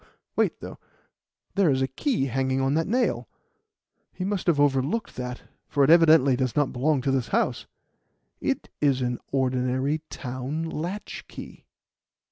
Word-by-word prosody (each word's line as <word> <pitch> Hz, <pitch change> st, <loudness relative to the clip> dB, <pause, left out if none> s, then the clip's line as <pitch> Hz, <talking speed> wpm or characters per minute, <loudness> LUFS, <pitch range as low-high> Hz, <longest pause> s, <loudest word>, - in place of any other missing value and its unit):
Wait, -, -, +1 dB
though. -, -, -8 dB, 0.7 s
There 195 Hz, -5 st, +3 dB
is 135 Hz, -1 st, +2 dB
a -, -, +1 dB
key 135 Hz, -, -1 dB
hanging 130 Hz, 0 st, 0 dB
on 135 Hz, +1 st, +1 dB
that 160 Hz, +2 st, +1 dB
nail. 245 Hz, +5 st, 0 dB, 0.8 s
He 185 Hz, -, -5 dB
must 195 Hz, -2 st, -2 dB
have 165 Hz, -4 st, +3 dB
overlooked 145 Hz, -, +1 dB
that, 125 Hz, -1 st, -5 dB, 0.2 s
for 140 Hz, -, +2 dB
it 135 Hz, -, +5 dB
evidently 160 Hz, -5 st, +6 dB
does 130 Hz, -2 st, -1 dB
not 145 Hz, -2 st, +1 dB
belong 140 Hz, +2 st, +1 dB
to 135 Hz, +1 st, 0 dB
this 130 Hz, -3 st, 0 dB
house. -, -, 0 dB, 0.7 s
It -, -, -2 dB
is 135 Hz, -3 st, +2 dB
an 125 Hz, 0 st, -2 dB
ordinary 130 Hz, +2 st, 0 dB
town 130 Hz, +4 st, -4 dB
latchkey." 175 Hz, +6 st, -7 dB
135 Hz, 145 wpm, -26 LUFS, 130-160 Hz, 0.8 s, evidently